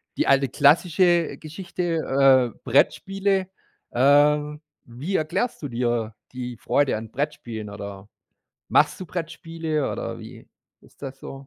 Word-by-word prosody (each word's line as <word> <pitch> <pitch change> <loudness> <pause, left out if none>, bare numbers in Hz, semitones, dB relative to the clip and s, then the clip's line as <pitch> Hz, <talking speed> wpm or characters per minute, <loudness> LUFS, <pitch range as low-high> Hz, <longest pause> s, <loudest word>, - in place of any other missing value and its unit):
die - - 0
alte 135 0 +4
klassische 170 +5 +3
Geschichte, 155 - +1
äh, - - -26
Brettspiele. 190 +8 +1 0.4
Ähm, 145 +3 +3 0.2
wie 140 +11 -3
erklärst 155 +10 -2
du 145 - -3
dir 120 -3 -1 0.2
die 125 -1 -6
Freude 140 +4 +1
an 110 0 -7
Brettspielen 120 -7 -4
oder 100 -1 -8 0.6
machst - - +3
du 185 - -7
Brettspiele 165 -3 -3
oder - - -5
wie - - -12 0.3
ist - - -23
das 135 -1 -8
so? 135 0 -9
145 Hz, 125 wpm, -24 LUFS, 125-165 Hz, 0.6 s, alte